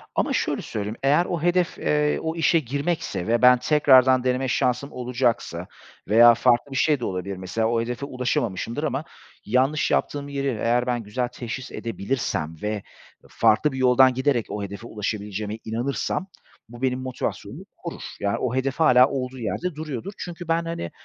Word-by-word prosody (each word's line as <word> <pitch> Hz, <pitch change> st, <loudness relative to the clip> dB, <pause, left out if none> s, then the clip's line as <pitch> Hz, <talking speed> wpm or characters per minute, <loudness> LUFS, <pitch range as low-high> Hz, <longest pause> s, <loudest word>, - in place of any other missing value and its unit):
ama -, -, +1 dB
şöyle -, -, 0 dB
söyleyeyim 105 Hz, 0 st, -4 dB
eğer 145 Hz, +6 st, +4 dB
o 175 Hz, -3 st, -3 dB
hedef, 175 Hz, +1 st, +1 dB
eee, 150 Hz, 0 st, +1 dB
o 160 Hz, 0 st, -3 dB
işe 165 Hz, 0 st, +3 dB
girmekse 145 Hz, -, -3 dB
ve 115 Hz, +1 st, +2 dB
ben 125 Hz, 0 st, +7 dB
tekrardan 130 Hz, -3 st, +5 dB
deneme 130 Hz, +1 st, 0 dB
şansım 125 Hz, +3 st, 0 dB
olacaksa 125 Hz, -1 st, -1 dB, 0.4 s
veya 115 Hz, +3 st, +8 dB
farklı 120 Hz, +3 st, +2 dB
bir -, -, -5 dB
şey 150 Hz, 0 st, +3 dB
de 120 Hz, -, -3 dB
olabilir. 95 Hz, +1 st, -4 dB
Mesela, 95 Hz, +5 st, -1 dB
o 115 Hz, 0 st, +1 dB
hedefe 120 Hz, +4 st, -4 dB
ulaşamamışımdır 125 Hz, -1 st, -2 dB
ama 145 Hz, -1 st, -1 dB, 0.4 s
yanlış 130 Hz, +7 st, +1 dB
yaptığım 145 Hz, -1 st, 0 dB
yeri 140 Hz, -1 st, -2 dB
eğer 120 Hz, 0 st, 0 dB
ben 120 Hz, -2 st, -1 dB
güzel 120 Hz, +4 st, -2 dB
teşhis 120 Hz, +1 st, -7 dB
edebilirsem 100 Hz, -8 st, -3 dB
ve 105 Hz, -1 st, -3 dB, 0.5 s
farklı 115 Hz, +7 st, +3 dB
bir 130 Hz, -, -6 dB
yoldan 130 Hz, 0 st, +5 dB
giderek 130 Hz, -2 st, +1 dB
o 105 Hz, -, -4 dB
hedefe 100 Hz, +4 st, -7 dB
ulaşabileceğime 105 Hz, 0 st, -4 dB
inanırsam 125 Hz, +10 st, -2 dB, 0.4 s
bu 120 Hz, +1 st, -12 dB
benim 130 Hz, -1 st, 0 dB
motivasyonumu 130 Hz, -1 st, -5 dB
korur. -, -, -7 dB, 0.2 s
Ya, 100 Hz, 0 st, 0 dB
o 125 Hz, -1 st, -1 dB
hedef 130 Hz, +1 st, 0 dB
hâlâ 125 Hz, -5 st, +6 dB
olduğu 130 Hz, -1 st, -4 dB
yerde 165 Hz, +9 st, -3 dB
duruyordur. 155 Hz, -, -5 dB
Çünkü 175 Hz, -1 st, -7 dB
ben, 165 Hz, 0 st, +1 dB
hani, 165 Hz, -, -4 dB
125 Hz, 165 wpm, -24 LUFS, 115-140 Hz, 0.5 s, veya